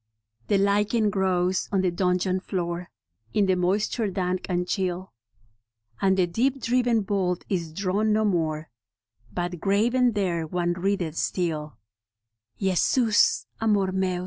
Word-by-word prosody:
The 200 - +3
lichen 205 +2 +2
grows 185 -2 0
on 195 -2 +2
the 185 -1 +1
dungeon 180 +1 +1
floor 175 -2 -4 0.5
In 205 - +4
the 190 -1 +2
moisture 200 +4 0
dank 185 -1 -2
and 180 0 0
chill, 185 -1 -2 0.9
And 190 -1 +3
the 185 - +4
deep 250 +10 0
driven 240 -1 +2
bolt 185 -3 -1
is 170 -5 -2
drawn 200 +5 0
no 215 +1 +2
more, 160 - -1 0.6
But 175 -1 -3
graven 235 +6 +2
there 175 -5 -1
one 175 +1 0
readeth 175 -3 -1
still 155 -4 -2 0.4
— 110 +1 -61
" 110 0 -54
Jesus 210 +4 +3 0.2
Amor 205 -4 +2
Meus!' 185 -1 0
185 Hz, 140 wpm, -25 LUFS, 175-205 Hz, 0.9 s, In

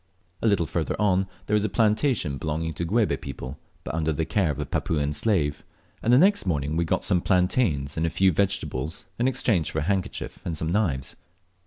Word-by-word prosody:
A - - +2
little 100 -6 +3
further - - -2
on 95 -2 +2 0.2
there - - -2
was 105 -1 +3
a 110 - 0
plantation 105 - +1
belonging 80 +2 -2
to 85 +3 -3
Guebe 110 +5 +1
people, 70 0 -7 0.2
but - - -5
under 80 -1 0
the 80 +1 -1
care 95 -4 +1
of 70 - -2
a - - -2
Papuan 75 -2 -1
slave, 75 -5 0 0.4
and 115 - +2
the 125 - +7
next 190 - +4
morning 75 -3 0
we 85 +1 +1
got 95 +3 0
some 90 -3 +3
plantains 90 - +1
and 80 - +1
a - - +1
few 95 +3 +3
vegetables 85 -4 -1
in 120 - +3
exchange 115 - +1
for - - -5
a - - +2
handkerchief 95 +1 -2
and 80 -2 -3
some 80 +2 -1
knives. 85 -10 0
85 Hz, 205 wpm, -25 LUFS, 75-105 Hz, 0.4 s, the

